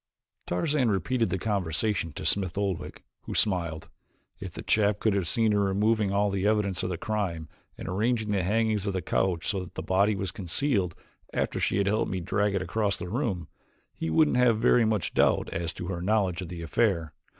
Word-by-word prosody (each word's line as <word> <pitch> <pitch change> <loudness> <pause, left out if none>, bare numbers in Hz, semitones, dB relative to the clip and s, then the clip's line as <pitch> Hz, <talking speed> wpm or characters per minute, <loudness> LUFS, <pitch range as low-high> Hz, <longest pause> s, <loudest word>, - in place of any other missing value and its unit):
Tarzan 130 - +1
repeated 110 +5 0
the 95 - -1
conversation 95 -2 0
to - - -6
Smith 95 -4 0
Oldwick, 100 -4 -3 0.2
who - - -5
smiled. 85 -6 0 0.5
"If - - -6
the - - -7
chap 105 -1 +2
could 110 - +2
have 95 -4 0
seen 110 +4 +2
her 105 - +2
removing 100 +1 +2
all 100 0 +1
evidence 100 -1 +1
of - - -2
the 90 - -3
crime 90 -6 -2 0.3
and - - -7
arranging 110 +3 0
the 100 -2 +1
hangings 105 +1 +1
of 100 - 0
the 95 - -2
couch 90 -3 0
so 100 - 0
that 90 0 -8
the - - -4
body 100 +3 +2
was 95 -1 -3
concealed 95 - 0 0.4
after - - -1
she - - +1
had 100 - +2
helped 105 +2 +1
me 95 - -2
drag 100 +3 0
it 95 - 0
across 100 +3 0
the 90 - -6
room, 95 - -2 0.5
he 80 - -4
wouldn't 145 - +3
have 125 -3 +4
very 115 +1 +4
much 110 -3 0
doubt - - +3
as 85 0 -2
to 85 - -6
her 85 -2 -3
knowledge 95 -2 +1
of 90 - -6
the 85 -1 -6
affair. 85 -4 0
100 Hz, 200 wpm, -27 LUFS, 90-110 Hz, 0.5 s, have